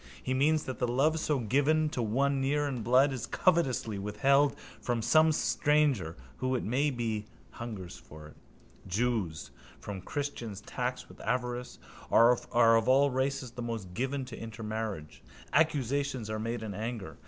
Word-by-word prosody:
He 130 Hz, -, -1 dB
means 150 Hz, +4 st, +2 dB
that 130 Hz, -, -6 dB
the 125 Hz, -, +1 dB
love 145 Hz, +7 st, +2 dB
so 150 Hz, -2 st, 0 dB
given 145 Hz, +6 st, +2 dB
to 140 Hz, -5 st, -3 dB
one 135 Hz, +5 st, +1 dB
near 145 Hz, +2 st, +1 dB
in 130 Hz, -4 st, -3 dB
blood 130 Hz, +5 st, +4 dB
is 125 Hz, -4 st, -4 dB
covetously 130 Hz, -, +1 dB
withheld 135 Hz, +8 st, +2 dB, 0.3 s
from 120 Hz, -2 st, -1 dB
some 155 Hz, +5 st, +5 dB
stranger 150 Hz, -, +1 dB, 0.2 s
who, 130 Hz, 0 st, 0 dB
it 125 Hz, -, -1 dB
may 135 Hz, +7 st, +1 dB
be, 115 Hz, -5 st, -3 dB, 0.2 s
hungers 105 Hz, -7 st, -7 dB
for 75 Hz, 0 st, -13 dB
it. -, -, -17 dB, 0.5 s
Jews, 100 Hz, -5 st, -1 dB, 0.3 s
whom 100 Hz, -2 st, -6 dB
christians 115 Hz, -4 st, -4 dB
tax 125 Hz, +2 st, -4 dB
with -, -, -14 dB
avarice, 125 Hz, +1 st, -2 dB, 0.3 s
are 115 Hz, +1 st, +6 dB
of 115 Hz, -2 st, +3 dB
all 135 Hz, +2 st, +5 dB
races 130 Hz, -1 st, -1 dB
the 120 Hz, +1 st, -7 dB
most 115 Hz, -6 st, -5 dB
given 130 Hz, +4 st, -2 dB
to 125 Hz, -3 st, -8 dB
intermarriage. 110 Hz, -6 st, -5 dB, 0.3 s
Accusations 140 Hz, -5 st, +1 dB
are 110 Hz, -, -2 dB
made 115 Hz, +1 st, -3 dB
in 105 Hz, -2 st, -5 dB
anger. 105 Hz, -6 st, -5 dB
125 Hz, 155 wpm, -30 LUFS, 110-140 Hz, 0.5 s, are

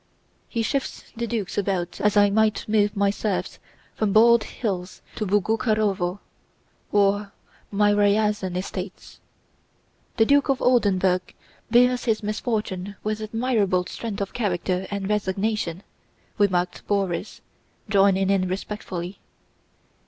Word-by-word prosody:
"He 230 Hz, -2 st, -1 dB
shifts 275 Hz, +3 st, -2 dB
the 235 Hz, +1 st, -3 dB
Dukes 210 Hz, -4 st, -2 dB
about 185 Hz, -3 st, -2 dB
as 210 Hz, 0 st, +2 dB
I 205 Hz, 0 st, +5 dB
might 220 Hz, +1 st, +1 dB
move 210 Hz, -1 st, +2 dB
my 200 Hz, 0 st, +3 dB
serfs 205 Hz, -1 st, -3 dB, 0.3 s
from 215 Hz, -2 st, 0 dB
Bald 230 Hz, +2 st, +6 dB
Hills 190 Hz, -5 st, -4 dB
to 215 Hz, -, -3 dB
Boguchárovo 205 Hz, -2 st, +1 dB, 0.7 s
or 205 Hz, 0 st, +2 dB, 0.4 s
my 205 Hz, 0 st, +3 dB
Ryazán 205 Hz, -2 st, +2 dB
estates." 185 Hz, 0 st, -6 dB, 1.0 s
"The 225 Hz, -, +5 dB
Duke 285 Hz, +3 st, +3 dB
of 270 Hz, -, +2 dB
Oldenburg 190 Hz, -7 st, +2 dB, 0.3 s
bears 250 Hz, +1 st, +4 dB
his 220 Hz, -2 st, 0 dB
misfortunes 210 Hz, -3 st, -3 dB
with 215 Hz, 0 st, -2 dB
admirable 215 Hz, -5 st, 0 dB
strength 215 Hz, 0 st, -5 dB
of 200 Hz, -, -4 dB
character 185 Hz, -4 st, -1 dB
and 200 Hz, -1 st, -3 dB
resignation," 200 Hz, -2 st, -1 dB, 0.6 s
remarked 180 Hz, -3 st, +1 dB
Borís, 195 Hz, -1 st, -1 dB, 0.5 s
joining 195 Hz, -2 st, +3 dB
in 190 Hz, -2 st, +2 dB
respectfully. 185 Hz, -1 st, -5 dB
205 Hz, 115 wpm, -24 LUFS, 190-220 Hz, 1.0 s, Bald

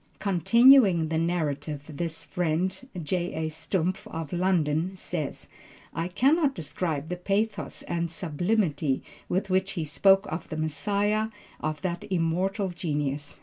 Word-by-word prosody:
Continuing 200 Hz, -, +5 dB
the 160 Hz, -, 0 dB
narrative 150 Hz, -4 st, -1 dB
this 160 Hz, +1 st, -4 dB
friend, 180 Hz, +7 st, -1 dB
J.A. 165 Hz, -1 st, -1 dB
Stumpf 160 Hz, +3 st, -2 dB
of 160 Hz, -1 st, -6 dB
London, 175 Hz, -1 st, +1 dB
says, 170 Hz, -5 st, -4 dB, 0.5 s
"I 165 Hz, +1 st, -2 dB
cannot 275 Hz, -, +3 dB
describe 155 Hz, -, -3 dB
the 180 Hz, -, -1 dB
pathos 200 Hz, +4 st, -1 dB
and 170 Hz, 0 st, -2 dB
sublimity 165 Hz, -3 st, 0 dB, 0.3 s
with 190 Hz, +1 st, -1 dB
which 190 Hz, +1 st, +1 dB
he 165 Hz, -3 st, -2 dB
spoke 195 Hz, +6 st, +4 dB
of 160 Hz, +1 st, -5 dB
the 155 Hz, -, -4 dB
Messiah 205 Hz, +7 st, 0 dB, 0.3 s
of 155 Hz, +2 st, -3 dB
that 175 Hz, -2 st, -2 dB
immortal 185 Hz, +3 st, 0 dB
genius. 150 Hz, -5 st, -3 dB
175 Hz, 125 wpm, -27 LUFS, 155-195 Hz, 0.5 s, Continuing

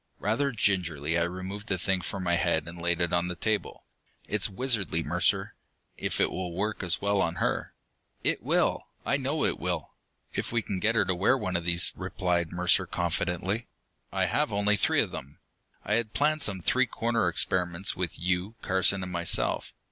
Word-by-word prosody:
Rather 115 Hz, +8 st, 0 dB
gingerly 85 Hz, -, 0 dB
I 85 Hz, -, +2 dB
removed 95 Hz, +4 st, -4 dB
the 95 Hz, -, 0 dB
thing 95 Hz, +1 st, 0 dB
from 95 Hz, +2 st, -5 dB
my 85 Hz, -1 st, +2 dB
head 85 Hz, -2 st, 0 dB
and 85 Hz, 0 st, -8 dB
laid 85 Hz, 0 st, 0 dB
it 85 Hz, -, +1 dB
on 85 Hz, 0 st, +2 dB
the 90 Hz, -, -4 dB
table. 105 Hz, +5 st, -2 dB, 0.4 s
"It's 105 Hz, -1 st, +2 dB
wizardry, 100 Hz, -6 st, 0 dB
Mercer! 85 Hz, +3 st, +1 dB, 0.4 s
If -, -, -3 dB
it -, -, +3 dB
will 90 Hz, -2 st, -4 dB
work 105 Hz, +3 st, -1 dB
as 90 Hz, -1 st, +1 dB
well 100 Hz, -1 st, +2 dB
on 85 Hz, -2 st, 0 dB
her...." -, -, -2 dB, 0.5 s
"It -, -, +1 dB
will, -, -, +1 dB, 0.2 s
I 140 Hz, -, +2 dB
know 140 Hz, +3 st, -1 dB
it -, -, 0 dB
will! 90 Hz, -4 st, -3 dB, 0.4 s
if -, -, -3 dB
we 115 Hz, -1 st, 0 dB
can 95 Hz, -2 st, -3 dB
get 110 Hz, +4 st, +2 dB
her 110 Hz, -, +3 dB
to 95 Hz, -, +1 dB
wear 95 Hz, +9 st, +3 dB
one 95 Hz, -6 st, -3 dB
of 85 Hz, 0 st, -1 dB
these," 85 Hz, 0 st, +5 dB
replied 90 Hz, -2 st, -1 dB
Mercer 90 Hz, 0 st, +2 dB
confidently. 95 Hz, +6 st, -2 dB, 0.4 s
"I -, -, +1 dB
have -, -, 0 dB
only 100 Hz, +1 st, +2 dB
three -, -, +3 dB
of -, -, -2 dB
them; 70 Hz, +2 st, -8 dB, 0.5 s
I 105 Hz, -, 0 dB
had 110 Hz, -2 st, -2 dB
planned 155 Hz, +1 st, +1 dB
some 100 Hz, -7 st, +4 dB
three 130 Hz, +4 st, +3 dB
cornered 115 Hz, -5 st, 0 dB
experiments 90 Hz, +1 st, +2 dB
with 90 Hz, -2 st, -3 dB
you, 90 Hz, +5 st, -1 dB
Carson, 95 Hz, +1 st, +2 dB
and 90 Hz, -, -6 dB
myself. 85 Hz, -1 st, +1 dB
95 Hz, 190 wpm, -28 LUFS, 85-105 Hz, 0.5 s, these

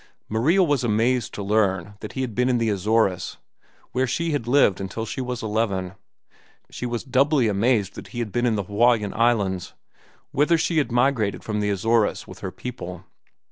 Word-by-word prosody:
Maria 150 Hz, -, +3 dB
was 145 Hz, -6 st, +1 dB
amazed 120 Hz, +2 st, +1 dB
to 100 Hz, -, -6 dB
learn 100 Hz, -2 st, +1 dB
that 105 Hz, -, -8 dB
he 130 Hz, -, -3 dB
had 125 Hz, -4 st, -3 dB
been 125 Hz, +3 st, +1 dB
in 125 Hz, -, +2 dB
the 115 Hz, -2 st, +1 dB
Azores, 100 Hz, -1 st, 0 dB, 0.5 s
where 130 Hz, +1 st, 0 dB
she 165 Hz, +7 st, -1 dB
had 145 Hz, -6 st, -2 dB
lived 120 Hz, -8 st, +4 dB
until 95 Hz, +4 st, -4 dB
she 125 Hz, -, -4 dB
was 125 Hz, -2 st, -4 dB
eleven. 105 Hz, -4 st, -1 dB, 0.8 s
She 125 Hz, -, -4 dB
was 120 Hz, -1 st, -3 dB
doubly 135 Hz, 0 st, +2 dB
amazed 105 Hz, -1 st, +1 dB
that -, -, -9 dB
he -, -, -10 dB
had 115 Hz, -3 st, -2 dB
been 120 Hz, +2 st, +1 dB
in 115 Hz, -, +2 dB
the 100 Hz, -, -1 dB
Hawaiian 105 Hz, +1 st, +2 dB
Islands, 105 Hz, -6 st, 0 dB, 0.6 s
whither 150 Hz, +4 st, +3 dB
she 160 Hz, 0 st, +1 dB
had 140 Hz, -, -1 dB
migrated 120 Hz, -5 st, +1 dB
from 105 Hz, -1 st, -2 dB
the 105 Hz, 0 st, 0 dB
Azores 110 Hz, +3 st, +1 dB
with -, -, -11 dB
her -, -, -4 dB
people. 90 Hz, -8 st, -7 dB
115 Hz, 185 wpm, -24 LUFS, 105-125 Hz, 0.8 s, lived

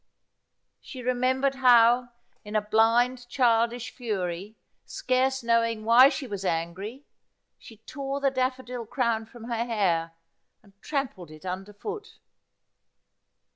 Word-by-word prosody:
She 255 Hz, -3 st, -10 dB
remembered 255 Hz, +2 st, +1 dB
44 265 Hz, -1 st, -1 dB
Asphodel. -, -, +9 dB, 0.4 s
how, -, -, -24 dB, 0.3 s
in 210 Hz, +1 st, -8 dB
a 215 Hz, -, +3 dB
blind 235 Hz, +4 st, +2 dB
childish 235 Hz, -1 st, +1 dB
fury, 200 Hz, -4 st, -4 dB, 0.3 s
scarce 260 Hz, 0 st, 0 dB
knowing 230 Hz, -1 st, +1 dB
why 245 Hz, +4 st, +8 dB
she 285 Hz, -, -4 dB
was 200 Hz, -5 st, -6 dB
angry, 190 Hz, -, -3 dB, 0.5 s
she 225 Hz, -, -14 dB
tore 275 Hz, 0 st, -4 dB
the 275 Hz, -1 st, +1 dB
daffodil 255 Hz, -2 st, -3 dB
crown 230 Hz, -3 st, -1 dB
from 235 Hz, 0 st, -13 dB
her 230 Hz, -1 st, -2 dB
hair 180 Hz, -8 st, 0 dB, 0.5 s
and 200 Hz, -2 st, -22 dB
trampled 275 Hz, -, -4 dB
it 155 Hz, +3 st, -13 dB
under 190 Hz, +2 st, -5 dB
foot. 420 Hz, -, -8 dB
235 Hz, 130 wpm, -26 LUFS, 210-255 Hz, 0.5 s, Asphodel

